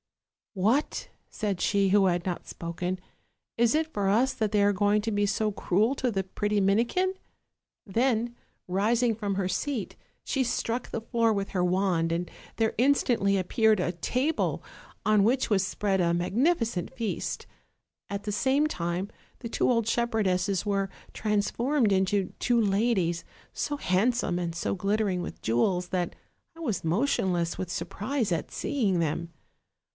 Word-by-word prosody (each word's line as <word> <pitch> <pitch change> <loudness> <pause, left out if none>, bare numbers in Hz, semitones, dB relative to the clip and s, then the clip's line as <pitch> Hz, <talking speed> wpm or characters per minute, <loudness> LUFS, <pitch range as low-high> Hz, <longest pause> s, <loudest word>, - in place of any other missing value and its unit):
" - - -68
'What,' 220 +9 +1 0.2
said 200 -5 -2
she 200 -1 +2
who 195 0 +5
had 175 -1 0
not 180 -2 -3
spoken, 175 +2 -4 0.6
'is 235 0 +3
it 315 +1 0
for 200 -1 0
us 245 +6 +3
that 215 -2 -1
they 205 -2 +3
are 205 0 +4
going 205 +2 +3
to 225 - -1
be 205 0 +1
so 215 +1 0
cruel 205 +5 +1
to 255 -3 0
the 195 -2 -1
pretty 205 +2 -1
Minikin?' 235 - +2 0.7
Then, 235 +2 +1 0.3
rising 225 +5 +2
from 205 -3 -2
her 190 -1 0
seat, 225 +4 -2 0.3
she 270 - +1
struck 240 0 -2
the - - -3
floor 230 0 +1
with 200 -2 -1
her 180 -2 0
wand, 180 -2 +1
and 170 +1 -1 0.3
there 225 -1 +1
instantly 240 -7 +3
appeared 215 +3 +3
a 175 - 0
table, 255 - -1 0.4
on 210 -1 +4
which 250 +5 +2
was 195 -2 +3
spread 195 0 0
a 170 -1 +2
magnificent 225 - 0
feast; 230 -4 -3 0.6
at 200 0 -4
the 210 - -3
same 270 +7 +2
time 175 - -2 0.3
the 230 - -6
two - - +1
old 230 -3 +2
shepherdesses 200 -5 +1
were 195 -1 0 0.2
transformed 220 +3 +1
into 190 0 +1
two 240 -1 +2
ladies, 195 -5 +1 0.3
so 290 - -2
hand 215 +1 +2
some 180 -7 -1
and 170 -2 -3
so 170 - -1
glittering 195 -1 0
with - - -7
jewels 175 - +1
that 180 -2 -1 0.4
I - - -12
was 235 - -2
motionless 175 - +1
with 185 - -3
surprise 210 +7 -2
at 165 - -3
seeing 210 -11 0
them. 165 +1 -1
205 Hz, 160 wpm, -28 LUFS, 185-235 Hz, 0.7 s, who